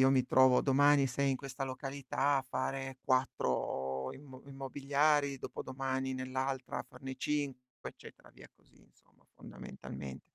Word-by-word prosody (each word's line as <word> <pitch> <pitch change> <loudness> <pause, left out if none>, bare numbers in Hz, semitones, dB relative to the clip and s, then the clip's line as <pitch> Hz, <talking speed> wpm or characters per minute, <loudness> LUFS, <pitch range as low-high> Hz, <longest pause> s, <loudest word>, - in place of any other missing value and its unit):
io 130 0 +7
mi 130 -2 +4
trovo, 130 -1 +6
domani 145 0 +5
sei 140 +2 +1
in 135 - +1
questa 135 +1 -5
località 135 +1 -1
a 135 - -2
fare 135 0 -3
4 65 - 0
immo 135 -2 -12
immobiliari, 140 +1 +1
dopodomani 130 +1 -3
nell'altra 130 0 -2
a - - -3
farne 135 0 -7
5, 135 -4 -3
eccetera, - - -15
via - - -15
così - - -25
insomma, - - -29
fondamentalment 65 -1 -8
135 Hz, 135 wpm, -34 LUFS, 130-140 Hz, -, io